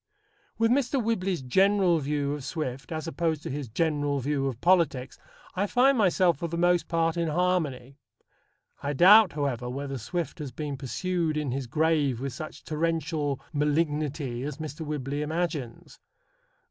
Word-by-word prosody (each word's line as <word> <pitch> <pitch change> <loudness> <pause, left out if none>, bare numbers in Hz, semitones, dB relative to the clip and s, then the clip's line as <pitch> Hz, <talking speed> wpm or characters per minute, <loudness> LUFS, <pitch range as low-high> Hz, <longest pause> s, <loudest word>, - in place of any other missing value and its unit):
With 225 0 +3
Mr. 270 +1 +2
Whibley's 195 - -1
general 190 +4 +3
view 145 0 -1
of 145 -2 -5
Swift 135 -3 -5
as 160 0 -3
opposed 165 -2 -1
to - - -4
his 140 -1 -4
general 145 +2 0
view 135 +1 -1
of 125 -4 -4
politics, 160 -8 +2 0.3
I 195 +2 0
find 260 +5 +4
myself 185 - +3
for 170 - -2
the 170 +1 -4
most 175 0 +2
part 165 0 0
in 170 -1 0
harmony. 150 -6 -1 0.8
I 145 +1 -2
doubt, 190 +6 +7
however, 135 -5 -2
whether 135 +1 -4
Swift 170 +7 -4
has 145 -4 -5
been 145 +2 -4
pursued 160 +4 -2
in 150 -4 -1
his 135 0 -3
grave 150 -3 +1
with 135 0 -4
such 155 +5 -8
torrential 155 -3 -1
malignity 150 -3 0
as 145 +1 -4
Mr. 155 0 -6
Whibley 145 -1 -3
imagines. 155 -6 -4
150 Hz, 155 wpm, -27 LUFS, 140-175 Hz, 0.8 s, doubt